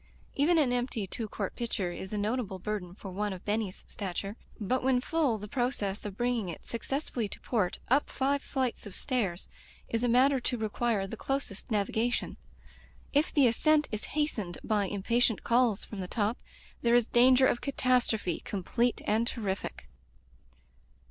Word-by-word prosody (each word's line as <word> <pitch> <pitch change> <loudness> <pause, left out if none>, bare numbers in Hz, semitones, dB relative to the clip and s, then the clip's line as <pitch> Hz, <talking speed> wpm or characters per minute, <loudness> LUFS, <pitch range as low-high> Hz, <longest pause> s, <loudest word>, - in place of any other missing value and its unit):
Even 320 +5 +3
an 275 -6 +3
empty 245 -4 -1
two 220 +4 -4
quart 200 -2 -4
pitcher 205 -6 -2
is 190 +2 -7
a 210 - -2
notable 210 -1 -1
burden 185 -2 -4
for 195 -2 -8
one 205 +2 -1
of 185 - -10
Benny's 210 -2 -2
stature, 195 +1 -4 0.2
but 250 +5 0
when 260 -1 +3
full 280 -3 +1
the 210 0 -7
process 215 -4 -1
of 200 -1 -5
bringing 240 -5 0
it 165 - -8
successfully 240 -2 -3
to - - -9
port, 205 -7 0
up 275 +4 +3
five 275 +1 +1
flights 260 -7 -2
of 195 - -8
stairs, 200 -9 -1 0.4
is 230 +1 0
a - - +3
matter 260 +3 +5
to 245 0 -1
require 220 -1 0
the 195 - -6
closest 270 -5 -3
navigation. 220 +3 0 0.8
If 290 +2 +3
the 285 -3 +5
ascent 300 +6 +3
is 215 -1 -3
hastened 215 - -1
by 210 -2 +1
impatient 225 +3 +1
calls 235 -3 +3
from 210 - -8
the 185 - -3
top, 215 +3 0 0.4
there 235 0 +4
is 240 -2 +5
danger 255 +2 +6
of 240 - +2
catastrophe, 250 - +1
complete 235 +5 0
and 220 +3 +2
terrific. 200 -6 -3
230 Hz, 165 wpm, -30 LUFS, 200-255 Hz, 0.8 s, danger